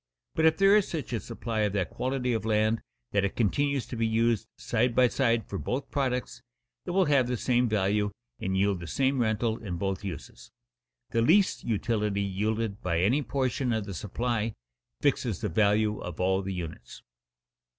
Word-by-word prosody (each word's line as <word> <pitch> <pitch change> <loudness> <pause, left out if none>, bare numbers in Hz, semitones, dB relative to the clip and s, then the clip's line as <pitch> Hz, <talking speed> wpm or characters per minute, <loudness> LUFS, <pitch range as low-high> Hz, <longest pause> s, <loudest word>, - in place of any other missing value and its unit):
But 160 - +2
if 160 - +3
there 195 +1 +6
is 210 -2 +3
such 155 -6 -4
a 115 - 0
supply 115 -1 -4
of 105 -2 +1
that 95 -5 -1
quality 130 -1 -1
of 110 - -1
land 110 0 +1 0.3
that 100 - +2
it 100 - -1
continues 140 +4 +1
to - - -7
be 115 -1 +1
used 115 -1 +1
side 120 +1 0
by 125 -1 +6
side 115 -2 +1
for 100 - -4
both 135 +2 -3
products, 130 -3 -1 0.4
it - - -5
will 185 +1 +3
have 140 -5 +3
the 125 0 -1
same 125 +1 +2
value 105 0 +1 0.3
and 95 0 -1
yield 100 -1 +2
the 85 - -7
same 135 +6 +1
rental 110 0 0
in 90 -5 -4
both 95 +2 -2
uses. 70 -9 -8 0.6
The 115 - +2
least 185 - +3
utility 105 -2 0
yielded 105 +2 -2
by 85 -2 0
any 125 +11 +3
portion 130 0 -1
of 110 -3 -1
the 100 - -6
supply 115 +3 -2 0.5
fixes - - +1
the - - -1
value 105 +3 +2
of 90 -2 -7
all 95 +1 +2
the 95 0 -4
units. 80 -8 -7
110 Hz, 185 wpm, -28 LUFS, 100-125 Hz, 0.6 s, there